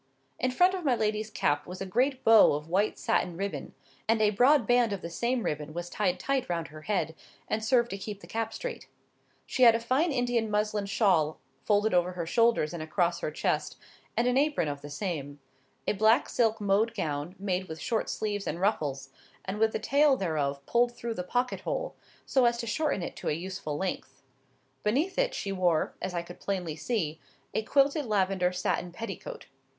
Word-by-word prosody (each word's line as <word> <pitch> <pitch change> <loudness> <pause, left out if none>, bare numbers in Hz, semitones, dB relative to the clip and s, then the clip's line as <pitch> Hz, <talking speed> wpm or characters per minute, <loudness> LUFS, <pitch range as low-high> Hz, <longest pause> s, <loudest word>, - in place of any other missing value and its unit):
In 255 - +1
front 360 +9 +4
of 370 -2 -3
my 265 -5 +3
lady's 215 -1 -1
cap 145 -7 0
was 180 +1 -7
a 195 - -3
great 255 +7 0
bow 225 -7 +7
of 150 +2 -4
white 195 +5 +1
satin 170 -2 0
ribbon; 200 +1 -4 0.3
and 225 0 +3
a 210 -1 +4
broad 250 +4 +4
band 245 -1 +3
of 195 - -5
the 170 - -5
same 240 +6 0
ribbon 150 +1 -3
was 175 0 -5
tied 185 -4 0
tight 275 -5 -1
round 170 -2 -2
her 155 0 -11
head, 160 -4 -1 0.3
and 215 0 -1
served 240 0 +3
to 195 - -4
keep 205 0 -6
the - - -13
cap 225 0 -3
straight. - - -6 0.6
She - - -3
had 230 -2 +8
a - - +1
fine 260 +8 +1
Indian 245 -4 0
muslin 210 -1 0
shawl 180 -8 +2 0.3
folded 210 0 +2
over 180 0 +2
her 175 -2 -3
shoulders 230 -4 +2
and 170 - -5
across 170 +2 0
her - - -2
chest, 155 - -1 0.4
and 235 - +3
an 250 +2 +3
apron 290 - +1
of 145 -1 -4
the 145 - -8
same; 145 -4 -4 0.5
a - - +1
black 220 +4 +3
silk 225 -2 +1
mode 210 +3 +2
gown, 155 -1 -3
made 190 -1 -2
with 160 -1 -7
short 225 - -1
sleeves 205 -2 -2
and 170 - -2
ruffles, 145 -9 -1 0.4
and 195 +2 -4
with 220 0 +3
the - - -1
tail 280 +4 +3
thereof 140 - -2
pulled 240 0 +2
through 235 -1 -4
the 180 - -4
pocket 245 +6 -1
hole, - - -3 0.3
so 260 -2 +3
as 235 0 +3
to 235 - -4
shorten 280 - 0
it - - -5
to - - -3
a - - +1
useful 170 -3 -4
length: 150 -8 -4 0.6
beneath 295 - 0
it - - +1
she 200 - -3
wore, 180 -4 +1
as 185 -1 -3
I 170 - -1
could 175 +1 -12
plainly 180 -6 -3
see, 165 -4 -2 0.3
a - - +1
quilted 280 +4 +2
lavender 190 -3 +1
satin 180 -1 -1
petticoat. 230 - -7
205 Hz, 200 wpm, -29 LUFS, 175-235 Hz, 0.6 s, had